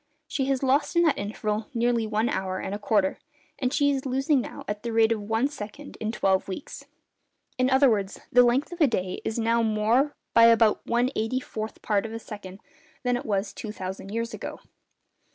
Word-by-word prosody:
She 270 -3 -1
has 270 0 0
lost 275 +5 +2
in 340 - +5
that 320 -4 +2
interval 210 +1 -3
nearly 235 -1 +1
one 215 +2 +1
hour 190 -3 -2
and 190 - -4
a 205 - -3
quarter, 205 -2 +1 0.4
and 255 -2 0
she 285 0 +3
is 270 -1 -1
losing 270 +1 +1
now - - -8
at 210 0 -3
the 235 - -4
rate 225 0 +4
of 220 -2 0
one 225 +5 +1
second 285 +1 -9
in 220 0 -2
twelve 190 -4 +1
weeks. 195 +8 -7 0.7
In 255 0 +3
other 270 +1 +5
words, 200 -5 0
the 245 - +7
length 245 +6 +2
of 350 0 -7
a 300 - +7
day 185 -6 -2
is 220 - -2
now 230 0 +2
more 225 +6 +2 0.2
by 230 - +7
about 230 -2 +5
one 240 +2 +2
eighty 225 +4 0
fourth 220 -3 -6
part 210 +1 +1
of 220 - -9
a - - -3
second 205 -4 -9 0.4
than 250 -1 +1
it 245 - -4
was 200 -1 -1
two 215 - -6
thousand 190 -1 -6
years 230 +2 -3
ago. - - -7
225 Hz, 205 wpm, -26 LUFS, 210-255 Hz, 0.7 s, the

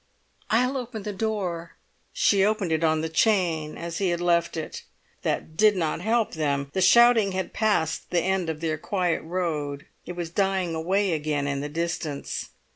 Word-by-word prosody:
"I'll 250 +4 +2
open 235 -4 -5
the 210 - -4
door." 190 -6 -3 0.4
She 205 - +3
opened 205 -4 +1
it 160 +1 +1
on 155 -1 +2
the 160 - -1
chain 160 -2 +1
as 170 -1 -5
he 195 -2 +1
had 175 0 0
left 170 -1 +1
it. 160 - -5 0.4
That 155 - -2
did 210 +3 +5
not 165 -2 -1
help 225 +3 +1
them. 140 -3 -1
The 190 - 0
shouting 225 0 +6
had 190 0 -3
passed 185 -7 0
the 175 - +2
end 190 -1 0
of 155 -1 -4
their 155 -2 -1
quiet 180 -4 0
road. 155 -5 -3 0.2
It 180 - -4
was 175 -2 -5
dying 190 -2 0
away 185 +4 +1
again 150 -2 -1
in 140 -1 -1
the 145 - -4
distance. 160 -2 -3
175 Hz, 180 wpm, -25 LUFS, 160-200 Hz, 0.4 s, shouting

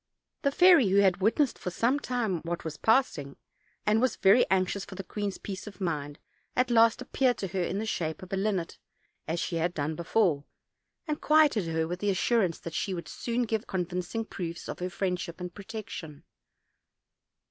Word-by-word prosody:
The 280 - +2
fairy, 345 - +6
who 195 - +3
had 190 -2 +4
witnessed 230 +7 +2
for 185 - -3
some 235 +10 +1
time 235 - -1
what 170 0 -4
waa 160 - -2
passing, 220 - +2 0.5
and 215 +1 +3
was 255 -3 +2
very 200 +6 +5
anxious 190 +1 +1
for 195 - -10
the 195 - -5
queen's 200 +1 -4
peace 195 +1 -7
of 200 -3 -10
mind, 150 -5 -3 0.4
at 250 0 +2
last 230 -1 +4
appeared 255 -2 +1
to 195 - -4
her 190 0 -2
in 180 +2 -1
the 215 - -2
shape 170 -3 -3
of 185 - -9
a - - +2
linnet, 195 -3 -1 0.5
as 165 +2 -1
she 170 - -2
had 175 +2 0
done 150 +1 -1
before; 170 -2 +1 0.6
and 300 -1 -2
quieted 300 - +4
her 160 0 0
with 175 +2 -4
the 205 - 0
assur 225 +5 +2
ance 175 -5 0
that 170 - -7
she 190 +3 -1
would 170 - -6
soon 240 +1 -2
give 220 -2 -1
her - - -24
convincing 180 +4 -3
proofs 170 -4 -6
of - - -6
her 180 +1 -2
friendship 180 -1 -3
and 180 -1 -6
protection. 195 -7 -8
195 Hz, 195 wpm, -29 LUFS, 175-225 Hz, 0.6 s, fairy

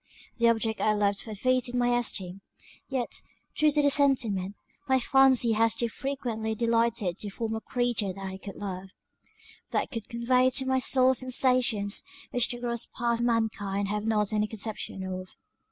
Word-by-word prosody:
The 235 -1 +4
object 225 -1 0
I 215 - +3
loved 205 -1 +1
forfeited 250 +3 -1
my 245 0 +2
esteem; 195 -5 -3 0.5
yet, 260 -3 -2 0.3
true 305 -1 +4
to 295 0 +2
the 285 - +5
sentiment, 225 -9 +2 0.3
my 265 0 +4
fancy 260 -2 +4
has 225 +1 +3
too 235 - -1
frequently 230 -4 -3
delighted 230 -5 0
to 210 - -5
form 220 +2 -4
a 220 - -3
creature 240 -6 -1
that 195 +1 -8
I 190 0 -6
could 200 -1 -8
love, 190 -1 -6 0.8
that - - -1
could 230 -4 -6
convey 250 +2 +2
to 265 +1 +1
my 260 0 +1
soul 260 0 +4
sensations 250 -5 +2 0.3
which 245 -1 +1
the 240 -2 -4
gross 235 -1 -2
part 235 -1 -1
of 240 - 0
mankind 205 -4 -1
have 210 +1 -2
not 210 -1 +1
any 210 0 +1
conception 215 -3 -5
of." 185 0 -6
230 Hz, 170 wpm, -28 LUFS, 205-250 Hz, 0.8 s, the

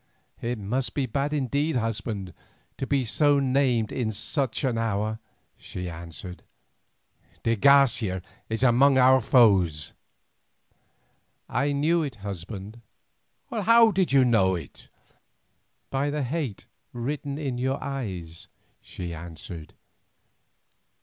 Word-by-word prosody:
"It 120 +1 -2
must 120 +6 -2
be 140 - +1
bad 140 +4 -1
indeed, 145 +2 0
husband, 105 -5 -3 0.5
to 135 - -3
be 140 -3 +1
so 145 +5 +3
named 130 -4 +1
in 115 -4 -1
such 130 +5 -1
an 130 -3 +1
hour," 110 -1 -1 0.4
she 90 -1 -6
answered. 85 +2 -9 1.0
"De 115 0 +2
Garcia 115 -7 +4 0.3
is 110 +3 -1
among 130 +2 +5
our 130 0 +6
foes." 95 - +3 1.5
"I 140 +2 0
knew 155 +4 +2
it, 145 -6 -4
husband." 100 +2 -7 0.7
"How 230 +1 +5
did 185 -4 +1
you 135 -2 +5
know 95 -6 +3
it?" 85 - -10 1.0
"By 135 +2 0
the 145 0 -2
hate 130 -5 -3 0.3
written 140 +3 -4
in 135 -5 -3
your 130 +2 0
eyes," 95 - -6 0.3
she 85 -2 -7
answered. 80 -1 -9
120 Hz, 115 wpm, -26 LUFS, 100-140 Hz, 1.5 s, our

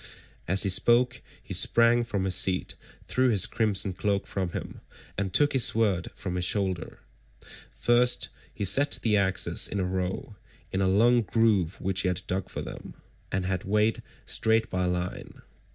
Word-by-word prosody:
As 95 +3 +4
he 100 - 0
spoke 120 +6 +2 0.2
he - - -7
sprang 120 +1 +3
from 105 -5 -3
his 95 -1 0
seat, 95 0 +1 0.3
threw 130 0 +1
his 105 -6 +3
crimson 100 -4 -1
cloak 100 +1 -1
from 95 -2 -3
him, - - -7 0.3
and 95 -1 -2
took 145 +8 +3
his 130 -3 +4
sword 100 -6 +1
from 90 - -5
his 90 - -1
shoulder. 95 -2 -1 0.7
First 120 +1 +2 0.2
he 100 - -4
set 140 +9 +2
the 110 -2 +2
axes 95 -2 +1
in 100 - -4
a 95 - 0
row, 95 +3 -4 0.3
in 95 - -1
a 95 - +2
long 120 +6 +4
groove 105 -4 +1
which 95 +1 -1
he 95 - -1
had 90 0 0
dug 95 0 -3
for - - -5
them, - - -9 0.4
and 95 0 -1
had 95 0 -2
made 105 +2 +1 0.2
straight 110 0 +1
by 90 0 -1
line. 90 0 -4
100 Hz, 170 wpm, -27 LUFS, 95-115 Hz, 0.7 s, As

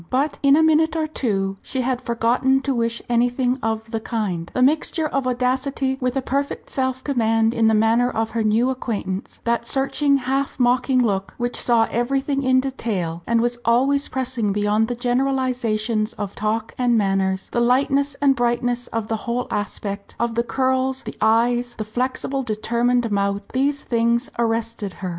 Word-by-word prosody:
But 280 +4 0
in 280 0 +5
a 320 - +4
minute 320 +1 +3
or 320 -1 0
two 195 -10 -2
she 260 - -2
had 255 0 -1
forgotten 245 +3 +1
to 275 0 -1
wish 230 -1 -1
anything 245 +2 +1
of 220 0 -3
the 225 - -1
kind. 200 -7 -3
The 255 - +3
mixture 310 +3 +2
of 275 -3 -1
audacity 260 +2 -1
with 255 +1 0
a 265 - -1
perfect 280 +2 -3
self 260 -1 -1
command 225 -4 +1
in 230 -2 +2
the 220 - +4
manner 225 +3 +3
of 225 -2 -2
her 230 - -1
new 225 +4 +2
acquaintance, 210 -6 -4
that 235 0 0
searching 280 +1 +2
half 270 +1 -2
mocking 250 +1 +3
look, 195 -4 -1
which 240 0 -2
saw 230 -2 +3
everything 270 +4 0
in 260 -1 +3
detail, 200 -11 -3
and 230 0 +2
was 240 0 -1
always 270 +5 +2
pressing 255 -5 -1
beyond 210 +2 +1
the 245 - -3
generalisations 245 -3 0
of 205 -2 -5
talk 215 +1 -2
and 245 -2 +3
manners, 195 -2 0
the 240 - 0
lightness 275 +3 +2
and 275 -1 +5
brightness 240 0 0
of 225 -1 -3
the 225 - -1
whole 245 +1 -1
aspect, 200 0 -4
of 235 0 0
the 235 - +1
curls, 260 +2 0
the - - -7
eyes, 240 +2 +2
the 215 - -4
flexible 255 +4 -2
determined 235 +1 0
mouth, 200 0 0
these 280 +2 0
things 235 +1 +1
arrested 230 -3 -1
her. 185 - -5
240 Hz, 175 wpm, -22 LUFS, 225-260 Hz, -, in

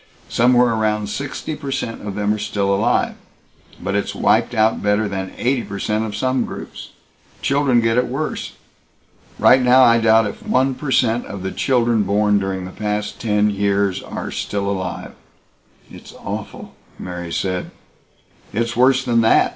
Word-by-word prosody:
Somewhere 125 0 +4
around 105 -2 0
sixty 140 +5 -4
per 145 -2 -7
cent 125 -4 -3
of 100 - -4
them 105 0 +1
are 105 - -4
still 100 -1 -1
alive, 110 +5 +1 0.7
but 100 +2 -3
it's 100 0 -1
wiped 120 - +2
out 110 0 +2
better 105 +1 +1
than 95 -1 -4
eighty 125 0 +1
per 100 - -7
cent 105 +2 -1
of 105 -2 -5
some 130 +3 0
groups. - - -8 0.5
Children 140 -3 +2
get 115 +1 +2
it 125 - 0
worse. 135 +5 -4 0.8
Right 130 +1 +5
now 125 +1 +6
I 115 -1 +5
doubt 115 0 +4
if 105 - -6
one 130 +1 +1
per 145 +2 -6
cent 120 -2 +2
of 100 -2 -7
the 95 - -3
children 120 -4 +1
born 105 +1 +2
during 95 -1 -3
the 90 - -8
past 105 0 -3
ten 105 -2 +2
years 100 -1 0
are - - -6
still 100 -1 -3
alive." 95 -2 -4 0.8
"It's - - -12
awful!" - - -7 0.2
Mary 90 -2 -6
said. 95 +1 -2 0.8
"It's 115 +1 -1
worse 130 +2 +3
than 120 -2 +3
that. 110 - +4
110 Hz, 165 wpm, -20 LUFS, 100-125 Hz, 0.8 s, now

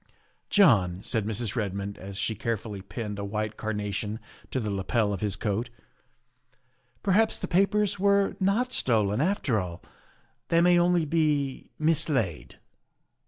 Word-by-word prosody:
' - - -37
' - - -40
" - - -48
John," 95 - +4
said 110 -4 0
Mrs. 110 -1 -2
Redmond 100 -2 -3
as 95 +1 -8
she 110 - -1
carefully 110 -2 -4
pinned 105 0 -6
a - - -3
white 105 +1 -3
carnation 105 0 -3 0.3
to 130 - -1
the 110 -4 -2
lapel 100 +2 0
of 95 - -5
his 105 -2 -1
coat, 110 +4 -2 0.7
" 125 -1 -41
perhaps 205 +3 +3
the - - -4
papers 200 +2 +2
were 200 0 +3
not 225 +7 +1
stolen 110 -2 +1
after 150 - +1
all; 90 -2 -6 0.6
they 165 - +3
may 175 0 +5
only 175 -1 +3
be 150 -3 0
mislaid." 130 - 0
115 Hz, 155 wpm, -27 LUFS, 100-165 Hz, 0.7 s, may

